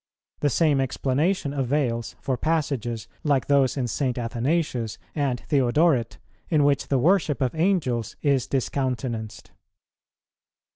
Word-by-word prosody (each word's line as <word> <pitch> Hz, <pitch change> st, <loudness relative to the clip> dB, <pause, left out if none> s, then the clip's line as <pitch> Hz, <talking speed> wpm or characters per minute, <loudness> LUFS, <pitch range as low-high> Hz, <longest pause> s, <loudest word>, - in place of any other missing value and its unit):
The 145 Hz, -, +2 dB
same 145 Hz, -2 st, +2 dB
explanation 140 Hz, +5 st, 0 dB
avails 130 Hz, -4 st, -1 dB
for 130 Hz, -, -1 dB
passages 125 Hz, -7 st, -1 dB, 0.2 s
like 140 Hz, -4 st, +2 dB
those 140 Hz, -1 st, +2 dB
in 125 Hz, -2 st, 0 dB
St. 130 Hz, 0 st, -1 dB
Athanasius 120 Hz, -1 st, -1 dB, 0.2 s
and 140 Hz, -5 st, -1 dB
Theodoret, 135 Hz, -2 st, +2 dB, 0.3 s
in 155 Hz, -3 st, +3 dB
which 140 Hz, -1 st, +2 dB
the 135 Hz, -, +2 dB
worship 160 Hz, +1 st, +2 dB
of 130 Hz, -2 st, 0 dB
Angels 155 Hz, -, 0 dB
is 135 Hz, -3 st, +2 dB
discountenanced. 125 Hz, -4 st, -3 dB
135 Hz, 115 wpm, -25 LUFS, 120-150 Hz, 0.3 s, in